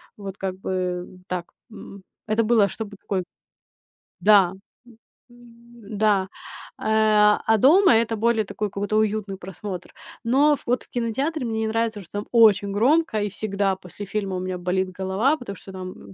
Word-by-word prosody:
вот 200 -2 -8
как 190 -1 -4
бы 180 -2 -3 0.2
так, 180 -1 -3 0.3
м, 200 -3 -11 0.2
это 220 +1 +2
было, 215 -3 +4
чтобы 205 +1 -7
такой 195 -2 -3 1.0
да, 200 -4 +5 0.3
м, 235 -2 -18 0.3
м, 235 -3 -13
да. 200 -3 +2 0.5
Э, 215 -1 +4
а, 220 0 +4
дома 330 - +6
это 225 0 +1
более 225 0 +1
такой 210 +1 -4
какой-то 205 +1 -2
уютный 215 -2 -1
просмотр. 190 0 -7 0.3
Но 280 +5 +4
вот 245 +1 0
в - - -28
кинотеатре 255 +6 -2
мне 220 -1 -2
не - - 0
нравится, 225 -1 -1
что 175 - -18
там 205 0 -4
очень 210 -4 +5
громко 245 +2 +2
и 205 - -1
всегда 195 -1 -1
после 190 +2 -10
фильма 195 -2 -3
у 180 - -3
меня 185 0 -4
болит 185 +1 -1
голова, 190 +10 0
потому 220 -9 -8
что 195 - -12
там 185 - -9
210 Hz, 165 wpm, -23 LUFS, 190-230 Hz, 1.0 s, дома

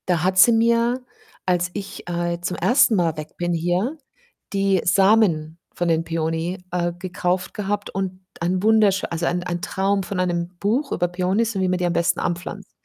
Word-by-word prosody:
Da 175 -3 +1
hat 185 +1 +1
sie 235 - +8
mir, 235 +2 +2 0.4
als 180 -1 +1
ich, 200 -3 -7
äh, 170 0 -1
zum 175 0 -3
1. 245 -2 +4
Mal 165 -4 +1
weg 155 0 -8
bin 175 0 -1
hier, 175 - 0 0.6
die 195 -1 +2
Samen 185 -4 +3 0.2
von 175 - -2
den 165 -1 +2
Peony, 165 +2 -2
äh, 175 -1 0
gekauft 180 0 -2
gehabt 205 0 -3
und 190 -1 -4 0.2
ein 180 +2 0
wunderschö 210 -3 +3
also, 170 0 -2
ein 175 0 -1
ein 175 -1 -3
Traum 195 +2 0
von 185 +1 -4
einem 175 -1 0
Buch 245 +8 0
über 175 - +1
Peonys 190 +6 0
und 190 - 0
wie 185 - +1
man 180 - +1
die 180 - -1
am 175 - 0
besten 170 +1 +1
anpflanzt 175 +1 -4
180 Hz, 185 wpm, -22 LUFS, 175-200 Hz, 0.6 s, sie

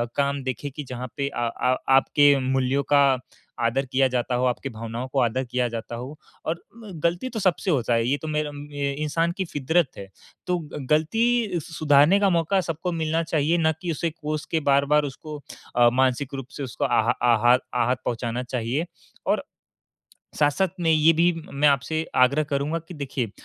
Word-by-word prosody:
काम 140 -1 0
देखें 130 +2 -4
कि 150 - -5
जहाँ 125 -1 -6
पे 140 -1 -1
आ 120 -4 -2
आ 125 +2 0 0.2
आपके 145 +2 +4
मूल्यों 130 +1 +1
का 145 - +3 0.7
आदर 135 +4 +1
किया 135 0 +3
जाता 125 0 -1
हो, 125 +1 +1
आपकी 125 +2 -1
भावनाओं 115 +2 -6
को 135 - +2
आदर 125 +3 +1
किया 125 0 -1
जाता 115 0 -6
हो 130 +6 -7 0.3
और 165 +2 -2 0.2
म 220 -3 -10
गलती 175 +9 0
तो 230 - -4
सबसे 185 -1 +1
होता 120 -4 +1
है, 115 0 +2
ये 140 - +1
तो 160 - -5
मेरा 150 -1 -1 0.2
ये 140 -1 -1
इंसान 165 +3 0
की 190 - -1
फ़ितरत 160 +1 +1
है। 100 - -8 0.4
तो 180 0 +1 0.2
ग 135 - -5
गलती 215 +5 +2
सु 160 +2 -11
सुधारने 150 +5 +4
का 200 - +3
मौका 180 +2 +2
सबको 165 +1 -3
मिलना 165 0 0
चाहिए, 160 +1 +1
ना 160 -1 +3
कि 175 - -2
उसे 165 +2 -1
कोस 155 -1 -5
के 160 - +2
बार-बार 140 +2 +3
उसको 155 +1 -8 0.4
अ, 120 0 +6
मानसिक 130 +1 +1
रूप 135 -2 -6
से 145 - -4
उसको 125 -5 -3
आह - - +2 0.2
आहात 120 +3 +4
आहत 125 +1 +1
पहुँचाना 120 +1 -2
चाहिए 125 +6 -2 0.4
और - - +1 0.9
साथ-साथ 150 +6 +2
में 170 -2 +1
ये 155 +1 +5
भी 170 +2 +3 0.2
मैं 145 +2 +3
आपसे 140 +3 +1 0.2
आग्रह 140 +4 +4
करूँगा 145 +3 -1
कि 180 - -9
देखिए, 135 -5 -3
145 Hz, 190 wpm, -24 LUFS, 125-160 Hz, 0.9 s, अ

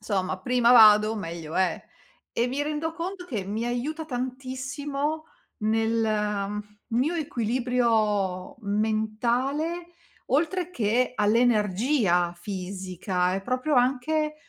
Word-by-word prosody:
insomma 190 -3 -2
prima 245 +1 +3
vado 215 -2 +7
meglio 165 -5 -6
è. 185 -3 +1 0.5
E 235 - +2
mi 275 +3 -1
rendo 305 +2 -2
conto 360 +2 -5
che 215 - -3
mi 215 +4 -3
aiuta 265 +7 -2
tantissimo 275 +3 -3 0.3
nel 215 -2 0 0.3
mio 255 +8 +1
equilibrio 230 - 0
mentale, 235 +10 -1 0.4
oltre 340 +6 0
che 245 - +1
all'energia 210 -3 +2
fisica 185 0 -2
è 195 - -2
proprio 255 +7 0
anche 290 +5 +1
235 Hz, 100 wpm, -26 LUFS, 205-275 Hz, 0.5 s, vado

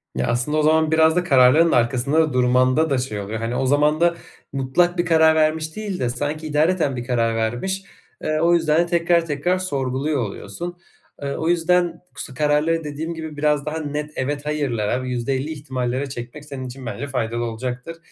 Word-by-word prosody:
Ya 65 -1 -1
aslında 125 +6 0
o 155 - +2
zaman 160 0 +3
biraz 160 0 +4
da 180 - +2
kararlarının 145 +2 +5
arkasında 135 +6 +2
durmanda 130 +5 +3
da 135 - +1
şey 125 -5 -3
oluyor. 105 +3 -4
Hani, 115 +2 -3
o 130 - 0
zaman 150 +3 +2
da 170 0 +4 0.4
mutlak 140 +7 +1
bir 175 - +1
karar 160 -1 +5
vermiş 155 0 +1
değil 210 -4 -4
de 125 - 0
sanki 145 +5 -3
idareten 155 -1 +1
bir 120 -1 -5
karar 115 -2 +1
vermiş, 120 +13 -1 0.4
ııı, 155 0 0
o 170 +1 +4
yüzden 160 -2 +3
de - - +1
tekrar, 170 -1 +2
tekrar 165 +4 0
sorguluyor 140 -4 -1
oluyorsun. 105 - -6 0.5
Iıı, 140 0 -2
o 160 - -1
yüzden 175 +1 +2 0.2
k - - -7
su 135 - -6
kararları 150 +3 +1
dediğim 155 +3 -4
gibi 160 -2 -7
biraz 150 -1 +1
daha 155 +1 -3
net, 150 0 -4
evet, 145 +2 -3
hayırlara 130 -6 -1
ve - - -5
%50 130 +4 -2
ihtimallere 130 -2 -3
çekmek 125 +3 -8
senin 140 -3 -6
için 130 +1 -9
bence 135 +4 -4
faydalı 120 -3 -2
olacaktır. 125 +7 -5
145 Hz, 190 wpm, -22 LUFS, 125-160 Hz, 0.5 s, kararlarının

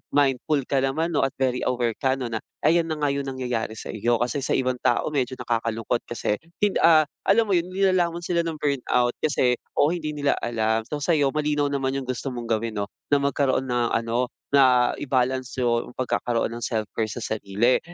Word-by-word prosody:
mindful 145 +1 +2
ka 135 - +1
naman 160 +5 0
'no, - - +3
at 135 - +1
very 125 -1 +1
aware 120 -3 0
ka 130 0 +2
'no, 125 - -2
na 110 - -1 0.3
ayan 165 0 +3
na - - 0
nga 145 - +1
yung 140 -1 -2
nangyayari 125 -4 -3
sa - - -7
iyo. 120 +3 +1
Kasi 125 +4 -1
sa - - +1
ibang 130 -1 0
tao 120 - +1
medyo 130 -3 -1
nakakalungkot 115 0 -1
kasi 115 -3 -1 0.3
hin 205 - +2
ah, 160 -2 +7 0.2
alam 225 +4 +5
mo - - -2
yun, 175 +1 +1
nilalamon 180 -3 +1
sila 170 0 0
ng 165 -1 -3
burnout 125 -4 +1
kasi 130 -5 +2 0.2
oo, 145 - +5
hindi 155 -3 -3
nila 145 -1 +1
alam. 110 -1 0
So, 150 +2 -4
sa'yo 145 -5 +2
malinaw 150 -1 0
naman 135 -1 -1
yung 130 - -8
gusto 130 +2 -3
mong 120 -1 -6
gawin 115 -1 -4
'no, 100 - -2 0.2
na 145 - +5
magkaroon 135 -1 +1
ng 120 -1 0
ano, 115 +2 0 0.2
na 130 -3 +5
i-balance 130 -1 -1
yung 120 0 0
pagkakaroon 120 -2 -1
ng 120 - -6
self-care 110 -1 -2
sa 120 - -5
sarili. 110 +3 +1
130 Hz, 195 wpm, -24 LUFS, 120-145 Hz, 0.3 s, ah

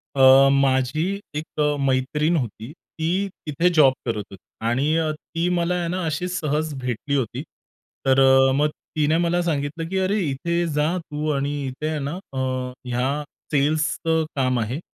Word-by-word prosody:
अ, 135 +1 +7
माझी 135 +2 +2 0.3
एक 155 0 -6
अ, 150 0 +2
मैत्रीण 150 +5 +1
होती. 115 0 -4
ती 175 +4 -3 0.2
तिथे 155 +4 +2
जॉब 140 -4 +6
करत 110 -4 -2
होती 100 - -10 0.3
आणि 135 +7 +1
अ, 160 -1 +1
ती 165 +3 -4
मला 175 0 +1
आहे 175 -1 -1
ना, 180 0 -2
अशी 160 +3 -2
सहज 155 -3 -1
भेटली 125 +3 -2
होती. 130 -6 -1 0.6
तर 135 0 +4
अ, 135 0 +6
मग 150 +2 +2 0.3
तिने 155 +1 +2
मला 175 +1 +1
सांगितलं, 160 0 -2
की 190 - -2
"अरे, 190 +3 +1
इथे 170 +6 -1
जा 150 +4 +1
तू 155 -3 -4
आणि 140 +1 -1
इथे 140 +4 -4
आहे 155 -1 -2
ना, 140 0 -3 0.8
ह्या 130 +5 -1 0.3
सेल्सचं 155 +2 +1
काम 130 -2 +1
आहे, 120 +7 -2
150 Hz, 160 wpm, -23 LUFS, 135-165 Hz, 0.8 s, अ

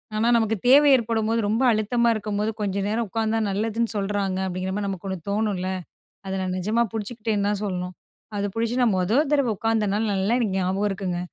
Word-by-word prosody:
"ஆனா, 225 +2 +1
நமக்கு 225 -1 +1
தேவை 285 +2 +7
ஏற்படும்போது, 225 -1 0
ரொம்ப 230 +5 +1
அழுத்தமா 235 +2 +2
இருக்கும்போது, 210 0 -2
கொஞ்ச 200 -2 -1
நேரம் 225 0 -1
உட்காந்தா 225 +1 0
நல்லதுன்னு 225 +3 -1
சொல்றாங்க." 195 -1 -1
அப்படீங்கிற 185 +1 -3
மாதிரி 205 -1 -2
நமக்கு 195 0 -5
ஒண்ணு 190 - -3
தோணும்ல்ல. 200 -3 -1 0.6
அத 190 - -3
நான் 185 -1 -2
நெஜமா 215 +6 +1
புடிச்சுக்கிட்டேன்னு 215 -1 -2
தான் 210 -1 -1
சொல்லணும். 180 -1 -3 0.4
அது 200 - -1
புடிச்சு 230 +1 -1
நான் 225 -5 +3
மொத 185 +4 0 0.2
தரவ 280 -5 +3
உட்காந்த 225 -2 +1
நாள், 215 +2 0
நல்லா 195 +4 +1
எனக்கு 210 -6 0
ஞாபகம் 190 +3 0
இருக்குங்க. 190 -3 -3
210 Hz, 180 wpm, -24 LUFS, 195-225 Hz, 0.6 s, தேவை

